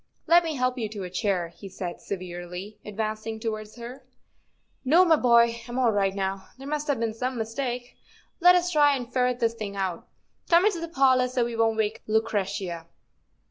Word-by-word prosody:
''Let 345 +1 +6
me 320 -2 -3
help 255 -1 0
you 220 -2 -2
to 205 -2 -6
a 180 - -7
chair," 185 -3 -1
he 195 +4 -11
said 180 -2 -6
severely, 180 +1 -7
advancing 215 +1 -4
towards 215 -1 -5
her. 245 +3 -9 0.4
" - - -45
No, 325 +8 +5
my 330 -2 +6
boy, 235 -3 +4
I'm 240 +1 -5
all 250 -3 +3
right 195 -2 +1
now; 195 0 -3
there 270 - -10
must 300 +1 -2
have 285 -5 0
been 230 -1 -1
some 250 +3 -3
mistake. 245 +2 -4 0.4
Let 360 +1 +7
us 360 0 +1
try 290 -3 +5
and 250 -2 -6
ferret 250 -1 +1
this 230 -2 +1
thing 210 -3 -6
out. 190 -3 -3 0.4
Come 345 +2 +5
into 405 -5 +2
the 335 - -4
parlor, 260 -4 +3
so 250 -1 0
we 235 -1 -4
won't 225 -1 +2
wake 215 -1 -1
Lu¬ 220 +1 +4
cretia." 190 -5 -3
230 Hz, 200 wpm, -26 LUFS, 200-260 Hz, 0.4 s, Let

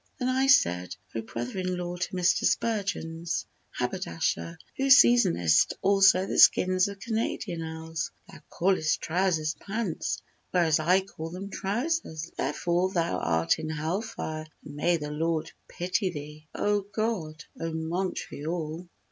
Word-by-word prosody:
Then 255 -3 -1
I 260 +1 +2
said, 90 - +3 0.2
"O 115 - -2
brother 120 - -5
in 185 -1 -1
law 175 0 -4
to 180 +1 -4
Mr. 180 -1 +2
Spurgeon's 170 -7 -1 0.2
haberdasher, 85 0 -2 0.2
Who 270 0 0
seasonest 205 - +5
also 195 -1 +5
the - - -1
skins 185 +1 +6
of 200 -1 -7
Canadian 220 -6 -2
owls, 160 0 -4 0.2
Thou - - -13
callest 175 -4 +1
trousers 165 -2 0
'pants,' 200 -4 -3 0.3
whereas 165 -4 +3
I 180 +5 +4
call 165 -4 -8
them 190 +4 -7
'trousers,' 200 - -2
Therefore 175 +6 0
thou 170 -2 0
art 80 - +1
in 155 0 -4
hell 160 +6 -1
fire 155 -8 -5 0.2
and 145 - -9
may 170 +3 +2
the 150 -1 -5
Lord 160 +1 -1 0.2
pity 185 +2 -1
thee!" 150 -1 -8
O 205 0 +1
God! 200 -6 -3 0.2
O 165 0 -3
Montreal! 165 0 -3
175 Hz, 140 wpm, -28 LUFS, 155-195 Hz, 0.3 s, skins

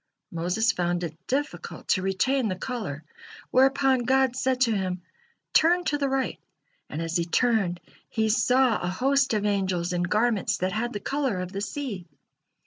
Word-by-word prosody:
Moses 180 +7 +1
found 175 -2 -1
it 160 -2 -4
difficult 285 +3 -3
to 185 - +3
retain 220 +7 +1
the 185 - -1
color, 185 - -5 0.5
whereupon 270 0 +4
God 260 +1 +2
said 260 -1 0
to 240 -3 +4
him: 185 -2 -2 0.5
"Turn 350 +3 +4
to 290 -3 0
the 280 -1 +1
right," 270 0 -1 0.5
and 150 - -5
as 165 +1 -1
he 170 - 0
turned, 195 -2 +1 0.3
he 220 -1 0
saw 250 +2 +3
a 175 - -2
host 270 +8 +2
of 210 -1 0
angels 185 -4 0
in 175 - 0
garments 215 +3 +1
that 185 +1 -1
had 235 +5 -2
the 205 - -3
color 270 -5 -1
of 180 0 -4
the 200 0 -4
sea. 205 -5 -5
220 Hz, 170 wpm, -26 LUFS, 180-260 Hz, 0.5 s, whereupon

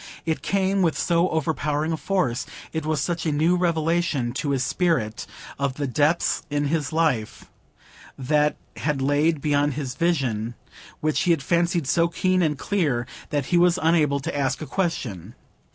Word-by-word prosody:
It 160 -1 -1
came 195 0 +1
with 165 -4 +2
so 170 +1 +2
overpowering 155 -1 -1
a - - +1
force,—it 160 -2 -3
was 155 -2 +1
such 170 +1 -2
a - - +2
new 160 +4 +2
revelation 165 -6 0
to 145 +2 -2
his 135 -2 +1
spirit, 140 - 0 0.3
of 140 -2 -1
the 145 - -2
depths 145 +6 +1
in 145 0 0 0.2
life 155 -9 0 0.7
that 150 +3 +2 0.2
had 150 -3 -1
lain 145 +4 +2
beyond 145 0 +1
his 135 -4 -3
vision, 125 -9 0 0.5
which 155 0 +1
he 180 - 0
had 165 -5 +2
fancied 170 -1 +1
so 170 +5 +3
keen 185 +2 +1
and 150 -4 +1
clear,—that 145 - -2
he 175 - +2
was 175 0 +4
unable 155 -4 +2
to 165 +3 -4
ask 135 -2 0
a 155 - -5
question. 125 - -3
155 Hz, 155 wpm, -24 LUFS, 140-170 Hz, 0.7 s, was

